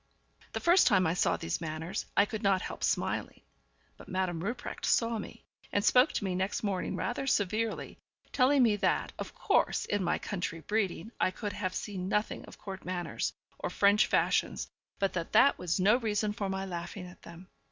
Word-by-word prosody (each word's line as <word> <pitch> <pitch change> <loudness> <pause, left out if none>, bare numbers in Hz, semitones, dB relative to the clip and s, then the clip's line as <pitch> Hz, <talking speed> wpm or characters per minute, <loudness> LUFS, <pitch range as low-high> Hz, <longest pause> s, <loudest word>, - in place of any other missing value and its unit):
The - - -1
first 350 +2 +5
time 190 -6 +4
I 160 - +2
saw 180 - +2
these 165 0 -3
manners 160 +2 -4
I 200 - +6
could 215 0 -5
not 195 -3 +2
help - - -6
smiling; - - -1 0.6
but - - -13
Madame 185 -3 -1
Rupprecht 235 +5 -5
saw 230 -1 +2
me, - - -9 0.3
and 205 - +1
spoke 255 +4 +5
to - - -2
me 190 -2 -1
next 190 +4 -1
morning 195 -3 -1
rather 255 +3 -2
severely, 215 0 -1 0.3
telling 270 0 +4
me 215 -3 +3
that, - - 0
of - - -6
course, - - +1
in 205 -2 -1
my 175 - +1
country 175 -4 -4
breeding 205 +2 -1
I - - +3
could 205 +1 -5
have 185 -3 -3
seen 190 -3 -4
nothing 210 +2 -1
of - - -13
court 195 -1 -8
manners, 175 -2 -3 0.3
or - - -2
French 205 +1 +4
fashions, - - +1 0.3
but 195 -1 0
that 170 -2 -4
that 280 +1 +5
was 180 0 -1
no 205 +6 +5
reason 215 -3 0
for 200 -2 -3
my 190 0 -2
laughing 175 +1 -6
at 180 0 -13
them. 170 +3 -12
195 Hz, 190 wpm, -31 LUFS, 180-215 Hz, 0.6 s, I